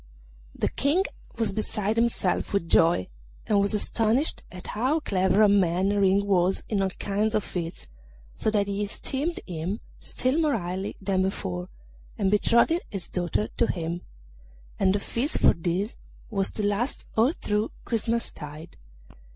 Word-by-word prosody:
The - - 0
King 300 +8 +2 0.3
was 225 -3 0
beside 215 0 -1
himself 230 -6 0
with 200 -4 0
joy, 165 - +4 0.4
and 205 -2 +3
was 200 +2 +1
astonished 225 +7 +2
at 180 +1 -10
how 260 +9 0
clever 190 - +2
a - - +7
man 190 -1 +3
Ring 200 -1 +3
was 190 -1 +2
in 205 -3 0
all 190 - +1
kinds 205 +3 -1
of 215 - +1
feats, 170 -1 -5 0.5
so - - 0
that 210 -2 +2
he 200 +1 -2
esteemed 275 +10 -3
him 180 +4 -3 0.2
still 260 +5 0
more 300 -6 +2
highly 185 +1 -4
than 190 -1 0
before, 90 - -2 0.5
and 195 -1 +1
betrothed 235 - +3
his 195 -4 -5
daughter 180 +4 -1
to 235 - +3
him; 170 0 -3 0.8
and 190 0 +3
the - - +1
feast 250 +9 0
for - - +6
this 180 +6 -2 0.3
was 195 -2 +1
to 210 - -2
last 205 +6 -1
all 230 +5 +4
through 210 -6 -1 0.2
Christmastide. 205 - -3
200 Hz, 150 wpm, -26 LUFS, 185-225 Hz, 0.8 s, a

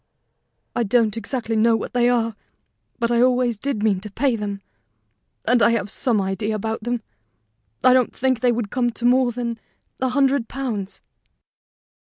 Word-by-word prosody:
"I - - +1
don't 225 -1 +2
exactly 225 0 -3
know 225 +1 +4
what 225 - -4
they 245 0 +3
are; 230 -3 +1 0.6
but 235 -1 0
I 235 0 +3
always 250 -1 +3
did 270 -4 -2
mean 205 -4 +2
to 210 +2 -8
pay 245 +4 0
them, 200 -2 -5 0.8
and 245 +1 +3
I - - +6
have 210 -3 -2
some 235 -5 +1
idea 195 +3 -1
about 220 +1 -3
them. 240 0 -2 0.8
I 255 - +7
don't 255 -2 +3
think 260 -2 0
they 250 -1 +3
would 230 -3 -2
come 245 -2 +1
to 240 - -5
more 250 0 +4
than 235 -1 -4 0.4
a 260 - 0
hundred 270 -2 +2
pounds." 225 -8 -4
235 Hz, 170 wpm, -22 LUFS, 215-250 Hz, 0.8 s, I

